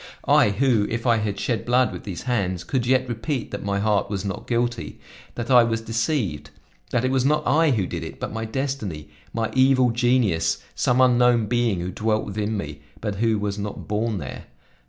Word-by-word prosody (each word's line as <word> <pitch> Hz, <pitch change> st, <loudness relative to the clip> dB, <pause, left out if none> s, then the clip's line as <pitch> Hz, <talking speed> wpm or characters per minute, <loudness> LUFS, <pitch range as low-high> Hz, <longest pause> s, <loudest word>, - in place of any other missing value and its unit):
I, -, -, +5 dB
who, 115 Hz, -1 st, +2 dB
if 115 Hz, +1 st, -3 dB
I 120 Hz, -2 st, +4 dB
had 105 Hz, -2 st, -2 dB
shed 115 Hz, -, -1 dB
blood 125 Hz, 0 st, +2 dB
with -, -, -8 dB
these 95 Hz, -5 st, -6 dB
hands, 95 Hz, -8 st, -1 dB
could 120 Hz, +5 st, -1 dB
yet 130 Hz, 0 st, +3 dB
repeat 120 Hz, +3 st, -3 dB
that 100 Hz, -, -5 dB
my 100 Hz, 0 st, -1 dB
heart 105 Hz, -1 st, +1 dB
was 100 Hz, -1 st, -3 dB
not 95 Hz, -, -5 dB
guilty; 120 Hz, 0 st, -1 dB, 0.4 s
that 120 Hz, +2 st, -4 dB
I 125 Hz, -2 st, +8 dB
was 115 Hz, -1 st, 0 dB
deceived, 115 Hz, -, -2 dB, 0.4 s
that 125 Hz, 0 st, 0 dB
it 130 Hz, -, +1 dB
was 130 Hz, -1 st, +2 dB
not 150 Hz, +2 st, +1 dB
I 160 Hz, +1 st, +4 dB
who 110 Hz, -8 st, +1 dB
did -, -, -5 dB
it, -, -, -8 dB
but -, -, -4 dB
my 110 Hz, 0 st, -3 dB
destiny, 110 Hz, -, -4 dB, 0.2 s
my 115 Hz, -1 st, -2 dB
evil 130 Hz, -1 st, +4 dB
genius, 115 Hz, -9 st, +2 dB, 0.2 s
some 125 Hz, +1 st, +2 dB
unknown 125 Hz, -2 st, +4 dB
being 115 Hz, -5 st, 0 dB
who 90 Hz, +1 st, -3 dB
dwelt 110 Hz, +3 st, 0 dB
within 105 Hz, +1 st, -2 dB
me, 75 Hz, -6 st, -6 dB, 0.2 s
but 105 Hz, -3 st, -3 dB
who 110 Hz, 0 st, +2 dB
was 105 Hz, 0 st, -3 dB
not 100 Hz, 0 st, -6 dB
born 105 Hz, +1 st, -1 dB
there! 65 Hz, -8 st, -7 dB
115 Hz, 200 wpm, -23 LUFS, 100-125 Hz, 0.4 s, I